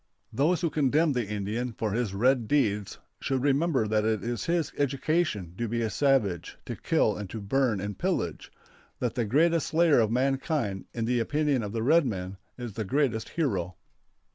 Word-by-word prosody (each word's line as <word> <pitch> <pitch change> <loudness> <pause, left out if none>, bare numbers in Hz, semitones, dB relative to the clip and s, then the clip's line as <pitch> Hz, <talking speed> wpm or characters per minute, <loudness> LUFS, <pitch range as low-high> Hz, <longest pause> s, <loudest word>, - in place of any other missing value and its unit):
Those 165 +6 +2
who 170 -3 0
condemn 150 +2 +2
the 120 -4 -1
Indian 105 +4 -3
for 110 -1 -2
his 110 -2 -1
red 120 +2 +2
deeds 105 -8 0 0.2
should 130 -2 -1
remember 140 -4 +2
that 105 0 +1
it 110 -1 0
is 120 0 -3
his 170 -2 0
education 140 - 0
to 120 - -1
be 115 +1 -1
a 110 - -1
savage, 110 - +1
to - - -5
kill - - +1
and 105 -3 -6
to 110 - -5
burn 115 +1 +1
and 100 +1 -4
pillage; - - -2 0.5
that 125 -3 -2
the 120 -3 -1
greatest 160 +7 +2
slayer 160 -4 +4
of 110 -2 +3
mankind, 130 - 0
in 115 -1 -3
the 120 +1 +1
opinion 145 +2 +1
of 105 -2 -4
the 110 0 -2
red 155 +3 +4
men, 95 -3 -4 0.2
is 120 -4 -6
the 110 - -3
greatest 115 0 0
hero. 95 - -1
120 Hz, 185 wpm, -28 LUFS, 105-145 Hz, 0.5 s, slayer